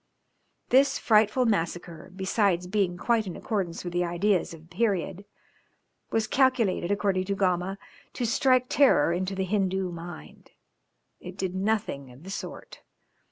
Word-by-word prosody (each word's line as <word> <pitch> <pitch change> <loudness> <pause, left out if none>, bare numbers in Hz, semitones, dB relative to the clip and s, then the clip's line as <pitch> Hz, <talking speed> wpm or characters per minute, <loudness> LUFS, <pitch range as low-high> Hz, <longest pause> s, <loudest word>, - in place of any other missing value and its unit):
This 270 +2 +4
frightful 220 +3 +3
massacre, 170 -5 -2
besides 190 -2 +1
being 185 -2 0
quite 225 +1 +1
in 180 - -5
accordance 190 -6 -3
with 175 -1 -5
the 175 0 +1
ideas 175 +2 +1
of 165 -2 -10
the 165 +2 -19
period, 200 -3 -1 0.8
was 225 -1 +1
calculated 230 -8 +2
according 200 -2 0
to 200 +1 -1
Gama, 185 0 0 0.4
to 245 - -2
strike 255 +2 +3
terror 250 - +4
into 185 +2 -2
the 190 0 -1
Hindoo 190 -1 0
mind: 165 - -10 0.7
it 180 +2 -10
did 190 -2 -2
nothing 190 - -2
of 130 +5 -16
the 190 - -8
sort. - - -8
190 Hz, 145 wpm, -27 LUFS, 175-215 Hz, 0.8 s, This